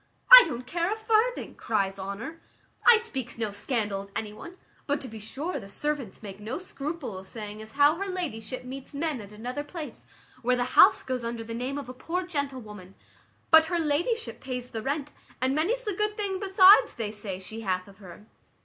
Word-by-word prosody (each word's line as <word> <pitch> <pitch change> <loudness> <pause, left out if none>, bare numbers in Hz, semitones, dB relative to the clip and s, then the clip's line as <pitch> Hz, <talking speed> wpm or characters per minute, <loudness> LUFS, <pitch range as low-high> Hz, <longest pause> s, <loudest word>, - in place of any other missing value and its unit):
"I - - +13
don't 245 +1 -5
care 340 +7 -1
a - - 0
farthing," 445 +2 +1
cries 195 -3 -1
Honour, 200 +12 -6 0.5
"I 470 - +10
speaks 265 - -4
no 220 -3 -2
scandal 205 -2 -2
of 200 0 -13
any 210 -1 -3
one; 345 - -11 0.3
but 285 0 +1
to 265 - -5
be 220 -2 -9
sure 280 - -4
the 195 -4 -11
servants 280 -3 -4
make 195 -1 -8
no 215 +4 -4
scruple 300 - -6
of 190 - -13
saying 210 -1 -7
as 220 0 -10
how 290 +3 +5
her 395 +2 -3
ladyship 255 - -4
meets 265 +3 -8
men 295 -4 -2
at 205 0 -12
another 245 +7 -5
place 310 0 -8 0.3
where 250 +1 +2
the 245 - 0
house - - +7
goes 255 -2 -3
under 235 0 -4
the 230 +1 -7
name 255 +4 -3
of 285 - -6
a 255 - -7
poor 345 +8 -3
gentlewoman; 250 - -5 0.6
but 320 -1 +8
her 345 +1 -1
ladyship 340 +9 -1
pays 250 -1 -5
the 225 - -4
rent, 285 +3 -2 0.3
and 260 +1 +1
many's 405 - 0
the 420 -3 -2
good 420 +2 -1
thing 395 -3 -2
besides, 390 +3 +6
they 220 -3 -3
say, 205 -3 -4
she 190 +4 -8
hath 185 -3 -2
of 195 0 -16
her." 190 +1 -12
260 Hz, 205 wpm, -27 LUFS, 215-335 Hz, 0.6 s, I